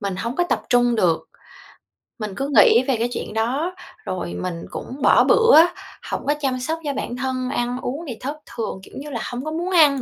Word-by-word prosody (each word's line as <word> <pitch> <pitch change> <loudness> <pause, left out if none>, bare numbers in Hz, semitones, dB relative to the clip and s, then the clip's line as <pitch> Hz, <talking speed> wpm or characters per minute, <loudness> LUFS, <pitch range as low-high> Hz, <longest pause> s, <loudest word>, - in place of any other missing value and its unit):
mình 200 -3 -3
hổng 235 +7 -4
có 355 - +2
tập - - 0
trung 245 -1 +4
được. 170 -5 +1 0.9
Mình 210 -2 -4
cứ 275 +4 -2
nghĩ 235 +3 +7
về 265 - +2
cái 235 +2 0
chuyện 215 - -5
đó 270 +11 -1 0.3
rồi 185 -2 -4
mình 175 -2 -4
cũng 270 +3 -7
bỏ - - +6
bữa, 460 -7 +6 0.5
hổng - - -3
có 290 - +4
chăm 260 -3 0
sóc 320 +6 -2
cho 285 -2 -2
bản 245 - -4
thân, 255 0 -2
ăn 245 -2 -1
uống 290 +7 -4
thì 240 - -5
thất 285 +4 -4
thường, 220 -4 -5
kiểu - - -15
như 295 +2 -7
là, 235 -5 -4
hông 250 +4 -5
có 310 - -3
muốn 345 +4 -3
ăn 295 -6 +5
255 Hz, 220 wpm, -22 LUFS, 230-290 Hz, 0.9 s, nghĩ